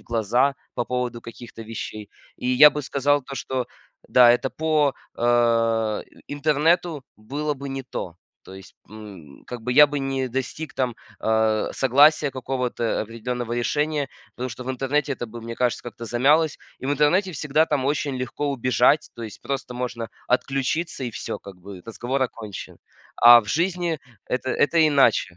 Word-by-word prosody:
в -, -, -19 dB
глаза 120 Hz, +4 st, +1 dB, 0.2 s
по 120 Hz, -, -1 dB
поводу 125 Hz, 0 st, -3 dB
каких-то 115 Hz, 0 st, -10 dB
вещей. 110 Hz, -1 st, -7 dB, 0.3 s
И 125 Hz, -, -4 dB
я 135 Hz, +4 st, +8 dB
бы 150 Hz, -, -4 dB
сказал 145 Hz, +2 st, +1 dB
то, 135 Hz, +1 st, -8 dB
что 130 Hz, -2 st, -3 dB, 0.4 s
да, 120 Hz, -1 st, +7 dB
это 125 Hz, +2 st, 0 dB
по, 155 Hz, -3 st, +1 dB, 0.2 s
э, 115 Hz, -2 st, +2 dB, 0.2 s
и -, -, -8 dB
интернету 155 Hz, +1 st, +1 dB
было 145 Hz, +7 st, -3 dB
бы 140 Hz, +1 st, -7 dB
не 135 Hz, 0 st, -4 dB
то. 90 Hz, -8 st, -6 dB, 0.3 s
То 95 Hz, -, -13 dB
есть, 95 Hz, -1 st, -13 dB, 0.2 s
м, 100 Hz, -10 st, -12 dB
как 125 Hz, -2 st, -7 dB
бы 125 Hz, -, -1 dB
я 150 Hz, +3 st, +8 dB
бы 145 Hz, 0 st, -3 dB
не 135 Hz, -1 st, -2 dB
достиг 135 Hz, +4 st, -4 dB
там, 125 Hz, -3 st, -1 dB, 0.2 s
э, 110 Hz, -1 st, +1 dB
согласия, 145 Hz, +3 st, +4 dB
какого-то 125 Hz, -3 st, -2 dB
определенного 115 Hz, +2 st, -5 dB
решения, 145 Hz, +4 st, -1 dB, 0.3 s
потому 130 Hz, +1 st, -4 dB
что 125 Hz, -, -8 dB
в 130 Hz, -, -3 dB
интернете 135 Hz, +2 st, -1 dB
это 120 Hz, -2 st, -5 dB
бы, 115 Hz, +1 st, -9 dB
мне 115 Hz, 0 st, -6 dB
кажется, 125 Hz, 0 st, -1 dB
как-то 120 Hz, -1 st, -8 dB
замялось. 145 Hz, +7 st, +2 dB, 0.2 s
И -, -, -5 dB
в 140 Hz, -, 0 dB
интернете 150 Hz, +7 st, +2 dB
всегда 150 Hz, +1 st, +1 dB
там 140 Hz, -4 st, -1 dB
очень 140 Hz, -1 st, -1 dB
легко 135 Hz, +3 st, -3 dB
убежать. 130 Hz, +2 st, +2 dB
То 120 Hz, -, -8 dB
есть 110 Hz, -3 st, -8 dB
просто 135 Hz, -2 st, -4 dB
можно 120 Hz, -2 st, -4 dB, 0.2 s
отключиться 135 Hz, +4 st, -1 dB
и 120 Hz, -, -4 dB
всё, -, -, -5 dB
как 100 Hz, -, -11 dB
бы, 95 Hz, 0 st, -11 dB
разговор 120 Hz, +4 st, -2 dB
окончен. 110 Hz, -5 st, -6 dB, 0.4 s
А 120 Hz, 0 st, +9 dB
в 105 Hz, -, -13 dB
жизни 170 Hz, -, -1 dB, 0.3 s
это, 130 Hz, +1 st, -2 dB
это 160 Hz, +3 st, +1 dB
иначе. 135 Hz, -10 st, +3 dB
125 Hz, 170 wpm, -23 LUFS, 115-145 Hz, 0.4 s, А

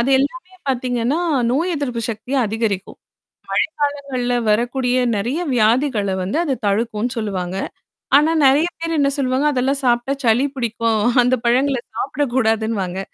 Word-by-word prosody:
அது 255 Hz, +4 st, +1 dB
எல்லாமே 345 Hz, +7 st, -3 dB
பாத்தீங்கன்னா, 250 Hz, +3 st, 0 dB, 0.3 s
நோய் 330 Hz, +8 st, 0 dB
எதிர்ப்பு 250 Hz, -5 st, -3 dB
சக்திய 225 Hz, +5 st, -4 dB
அதிகரிக்கும். 210 Hz, -3 st, -3 dB, 0.9 s
மழைக்காலங்கள்ல 270 Hz, -4 st, -3 dB, 0.2 s
வரக்கூடிய 245 Hz, +3 st, +1 dB, 0.2 s
நெறைய 245 Hz, -, -1 dB
வியாதிகள 225 Hz, -2 st, +2 dB
வந்து 185 Hz, +8 st, -2 dB
அது 285 Hz, -5 st, 0 dB
தடுக்கும்னு 225 Hz, +3 st, -1 dB
சொல்லுவாங்க. 190 Hz, -4 st, -3 dB, 0.6 s
ஆனா 310 Hz, +2 st, +3 dB
நெறைய 290 Hz, +6 st, +4 dB
பேர் 330 Hz, 0 st, -2 dB
என்ன 280 Hz, -1 st, +3 dB
சொல்லுவாங்க, 265 Hz, +1 st, 0 dB
அதெல்லாம் 270 Hz, +1 st, 0 dB
சாப்டா 240 Hz, +2 st, +1 dB
சளி 240 Hz, +4 st, +3 dB
பிடிக்கும். 230 Hz, -3 st, 0 dB, 0.2 s
அந்த 250 Hz, +1 st, +3 dB
பழங்கள 260 Hz, +3 st, +2 dB, 0.2 s
சாப்பிடக்கூடாதுன்னுவாங்க. 225 Hz, -9 st, -1 dB
245 Hz, 125 wpm, -19 LUFS, 225-275 Hz, 0.9 s, நெறைய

